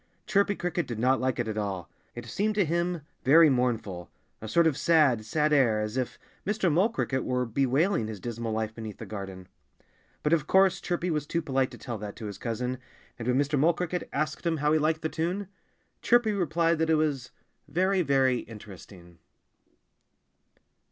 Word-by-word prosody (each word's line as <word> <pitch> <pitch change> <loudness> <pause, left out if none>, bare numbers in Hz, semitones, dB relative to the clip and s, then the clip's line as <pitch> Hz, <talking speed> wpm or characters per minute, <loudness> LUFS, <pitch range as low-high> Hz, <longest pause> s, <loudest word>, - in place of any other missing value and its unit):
Chirpy 200 0 +2
Cricket 175 -1 -2
did 120 - -5
not 130 +3 +2
like 130 -1 0
it 120 -2 -2
at 110 -1 -2
all. 95 -4 -3 0.3
It 120 -1 -7
seemed 210 - -1
to 205 -3 +3
him 170 +1 -1 0.2
very 155 +3 +7
mournful, 115 -9 -1 0.3
a 110 - -6
sort 170 +9 +3
of 160 -4 +3
sad, 150 -8 +3
sad 150 +6 +1
air, 120 -7 +4
as 105 +1 -3
if 130 -2 -2 0.3
Mr. 195 -3 +1
Mole 185 +8 +3
Cricket 130 - -2
were 125 0 0
bewailing 135 - +1
his 110 -2 -6
dismal 115 +1 -4
life 110 0 -2
beneath 110 -2 -8
the - - -8
garden. 95 -3 -7 0.8
But 150 - +2
of 155 -3 +1
course 190 -1 +4
Chirpy 175 0 -2
was 150 -2 -2
too 170 +1 -1
polite 135 -3 0
to - - -11
tell 120 -4 -6
that 105 -1 -7
to 110 - -8
his 100 -1 -7
cousin. 125 +2 -3 0.4
And 115 - -5
when 125 0 +2
Mr. 145 +1 +1
Mole 165 +5 +4
Cricket 180 0 -3
asked 155 +1 -2
him 165 -2 0
how 150 +1 +2
he 155 - +3
liked 155 +1 0
the - - +1
tune, 180 +5 -3 0.5
Chirpy 240 -3 +3
replied 170 -3 +1
that 160 0 +1
it 160 - +5
was 145 -5 -1 0.4
very, 185 +5 +1
very 135 -5 +2
interesting. 95 -5 -12
140 Hz, 190 wpm, -28 LUFS, 115-170 Hz, 0.8 s, very